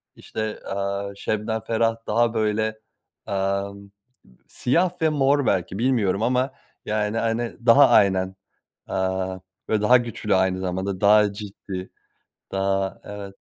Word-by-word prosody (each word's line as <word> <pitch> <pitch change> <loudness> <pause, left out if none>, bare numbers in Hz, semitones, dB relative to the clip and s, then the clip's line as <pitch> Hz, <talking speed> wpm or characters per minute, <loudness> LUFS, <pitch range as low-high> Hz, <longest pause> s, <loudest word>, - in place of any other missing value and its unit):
işte, 110 -1 -5
aaa, 100 0 -3
Şebnem 110 +2 -2
Ferah 115 0 +1
daha 115 +1 +2
böyle, 110 0 0 0.5
amm, 100 0 -2 0.6
siyah 175 +7 0
ve 160 - +4
mor 140 -1 +2
belki 95 0 0
bilmiyorum 110 -5 +1
ama 130 +2 +1 0.3
yani 105 +1 -1
hani 115 +1 -1
daha 135 +3 +7
aynen, 95 -2 +3 0.5
eee, - - -3 0.7
böyle 110 -1 +1
daha 125 +4 +6
güçlü 115 -4 -1
aynı 95 0 +2
zamanda 95 +1 -3
daha 105 0 +5
ciddi. 100 -2 -7 0.6
Daha 95 -1 -1
evet 100 -1 -8
105 Hz, 120 wpm, -24 LUFS, 100-115 Hz, 0.7 s, daha